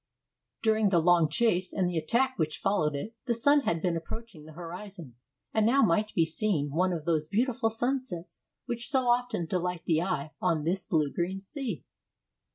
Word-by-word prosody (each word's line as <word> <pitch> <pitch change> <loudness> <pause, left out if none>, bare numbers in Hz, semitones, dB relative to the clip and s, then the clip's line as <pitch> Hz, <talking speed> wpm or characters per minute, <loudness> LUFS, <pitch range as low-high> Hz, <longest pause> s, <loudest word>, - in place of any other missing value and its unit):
During 220 -2 +3
the 185 - +3
long 170 -1 +4
chase 185 -1 +1
and 185 -2 0
the 175 -2 0
attack 260 +7 +1
which 155 -1 0
followed 155 -7 +1
it, 205 +11 -5
the 235 - +2
sun 285 +6 +4
had 170 - -1
been 175 -2 +1
approaching 180 0 -7
the 155 - -12
horizon, 175 - -8 0.4
and 220 - +3
now 260 +6 +4
might 210 +2 +2
be 165 - +4
seen 160 -4 0
one 180 +5 +1
of 165 -3 -4
those 155 -3 0
beautiful 230 +4 +1
sunsets 240 -6 -3 0.2
which 235 -2 -3
so 265 -3 +3
often 245 -6 +1
delight 180 0 -2
the 160 -1 +2
eye 155 -5 -2
on 155 -2 +1
this 175 +3 -1
blue 150 -4 +1
green 185 +3 -2
sea. 215 - -5
185 Hz, 180 wpm, -29 LUFS, 165-230 Hz, 0.4 s, long